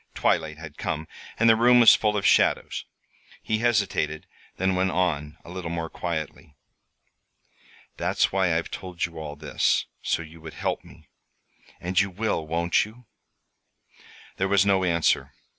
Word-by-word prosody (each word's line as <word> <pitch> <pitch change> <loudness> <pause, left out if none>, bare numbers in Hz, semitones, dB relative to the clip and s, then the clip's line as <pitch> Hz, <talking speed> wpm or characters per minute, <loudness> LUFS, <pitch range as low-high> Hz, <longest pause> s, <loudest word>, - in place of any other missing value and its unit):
Twilight 80 -1 0
had 80 -2 -11
come, 80 +1 -3 0.3
and 115 - +3
the 115 - +7
room 120 +2 +5
was 115 - +9
full 105 -1 +1
of 100 - -2
shadows. - - +2 0.6
He 110 0 0
hesitated, 100 -9 0 0.3
then 95 +1 +1
went 95 +1 +1
on, 80 -5 -1
a 85 - -10
little 90 -2 -5
more 85 -1 -4
quietly. 80 -4 -5 1.4
"That's - - +1
why 95 -4 +2
I've 85 - -4
told 90 -2 -4
you 85 -1 -8
all 75 -2 -6
this 75 0 0 0.2
so 85 - -1
you 80 +1 -14
would 80 0 -10
help - - -2
me. - - -17 0.7
And 90 +1 0
you 100 +1 +2
will, 95 -4 -2
won't 85 +3 +2
you?" 115 +4 -12 1.3
There 95 - +1
was 100 0 +3
no 95 -2 +3
answer. 85 -3 +1
90 Hz, 155 wpm, -25 LUFS, 80-100 Hz, 1.4 s, was